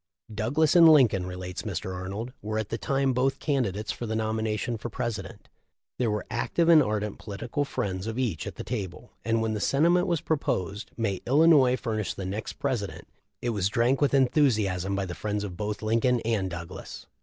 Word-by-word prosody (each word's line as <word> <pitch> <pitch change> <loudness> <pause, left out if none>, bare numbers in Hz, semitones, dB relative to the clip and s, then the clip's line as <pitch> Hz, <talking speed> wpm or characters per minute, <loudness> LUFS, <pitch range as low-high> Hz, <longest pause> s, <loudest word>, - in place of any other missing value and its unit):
"Douglas 140 +10 +1
and 165 -2 +9
Lincoln," 115 - +5
re 90 - -6
lates 90 0 -5
Mr. 95 -2 -4
Arnold, 100 +7 -5
"were 110 +1 -3
at 110 -2 -2
the 115 - -2
time 135 -1 +1
both 130 +2 +1
candi 135 -9 0
dates 105 +3 -4
for 120 - -5
the 110 - -2
nomination 110 +1 -1
for 115 +2 -6
President. 115 -2 -5 0.5
There 120 -3 +2
were 105 0 -2
active 170 -1 +1
and 160 -2 +8
ardent 105 -3 -2
political 115 +7 -3
friends 95 -6 -3
of 115 +1 -4
each 115 -12 -1
at - - -6
the - - -6
table, 105 -1 -5
and 115 0 +1
when 110 -1 0
the 105 - -2
sentiment 170 - +3
was 170 -4 0
proposed, 105 - -2
'May 100 -5 -1
Illinois 140 -2 +5
furnish 110 -5 -3
the 95 - -5
next 100 +4 -4
President,' 125 -8 -3 0.3
it 120 - 0
was 100 -3 0
drank 120 +6 +2
with 140 -1 +3
enthusiasm 105 - +2
by 100 -1 -1
the 90 - -5
friends 105 +2 -3
of 95 -4 -5
both 105 +2 -4
Lin 110 +2 +2
coln 125 0 +3
and 110 -5 0
Douglas. 85 0 -8
110 Hz, 200 wpm, -27 LUFS, 100-130 Hz, 0.5 s, and